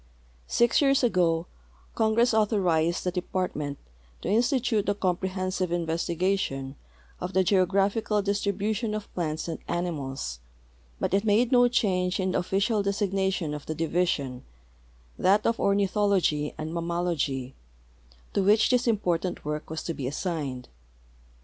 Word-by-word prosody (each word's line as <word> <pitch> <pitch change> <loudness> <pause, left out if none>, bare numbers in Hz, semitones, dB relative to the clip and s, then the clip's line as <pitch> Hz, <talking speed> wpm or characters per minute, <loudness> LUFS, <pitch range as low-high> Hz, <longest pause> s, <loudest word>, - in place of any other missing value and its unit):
Six 235 +4 +3
years 275 -1 +3
ago 175 -7 +2 0.5
Congress 225 +2 +2
authorized 180 -7 +2
the 180 - 0
Department 175 -5 -3 0.5
to - - -2
institute 240 -1 +2
a 205 - +1
compre 190 -1 -1
hensive 185 -1 -2
investigation 170 -4 -1 0.4
of 180 +1 -5
the 190 - +4
geographical 200 +3 +2
distribution 205 +2 -1
of 210 -1 -7
plants 160 -2 -2
and 165 - -4
animals, 140 - -3 0.6
but - - -1
it 200 +1 +3
made 225 +3 +3
no 245 -1 +6
change 185 -6 +1
in 185 0 0
the - - +1
official 200 +4 +1
designation 195 -4 -1
of 150 -1 -7
the 155 - -3
division 155 -6 -1 0.4
— - - -31
that 205 +3 +4
of 230 - +1
Ornithology 200 -6 +1
and 155 +1 -4
Mammalogy 170 -6 -2 0.4
— - - -29
to 200 - +2
which 215 +5 +4
this 250 0 +2
important 180 -7 0
work 150 0 -4
was 160 0 -4
to 165 - -3
be 135 -5 -4
assigned. 145 -4 -3
185 Hz, 135 wpm, -27 LUFS, 160-205 Hz, 0.6 s, no